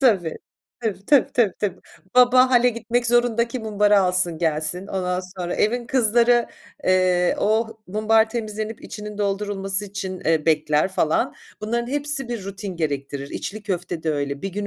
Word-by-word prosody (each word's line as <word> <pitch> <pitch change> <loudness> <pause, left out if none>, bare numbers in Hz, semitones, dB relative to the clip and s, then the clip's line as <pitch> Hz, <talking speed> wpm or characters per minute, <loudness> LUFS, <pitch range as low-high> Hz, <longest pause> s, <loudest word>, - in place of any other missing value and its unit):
Tabii. 195 - +2 0.4
Tabii, 210 -4 -3
tabii, 285 -3 +4
tabii, 230 -6 +3
tabii. 205 -3 -2 0.4
Baba 255 +1 +6
hâle 245 -1 +5
gitmek 235 +1 -1
zorunda 240 -1 +2
ki 255 - -4
mumbarı 210 -2 +3
alsın 180 -3 +1
gelsin. 160 +3 -1
Ondan 180 -2 -2 0.2
sonra 175 -1 -2
evin 240 +3 0
kızları, 240 -1 +3 0.4
eee, 185 -1 +3
o 220 +1 0
mumbar 220 +3 +2
temizlenip 215 -1 -4
içinin 210 0 -8
doldurulması 200 -1 -1
için, 190 -2 -5
eee, 160 -1 +1
bekler, 155 0 +2
falan. 160 -4 0 0.3
Bunların 235 +3 -2
hepsi 285 -3 -1
bir 235 -5 -4
rutin 195 -1 -6
gerektirir. 140 -3 -3
İçli 215 +1 -5
köfte 175 -4 -3
de 160 - 0
öyle 140 -1 -3
bir 195 - -2
gün 205 +2 -4
205 Hz, 155 wpm, -22 LUFS, 180-235 Hz, 0.4 s, Baba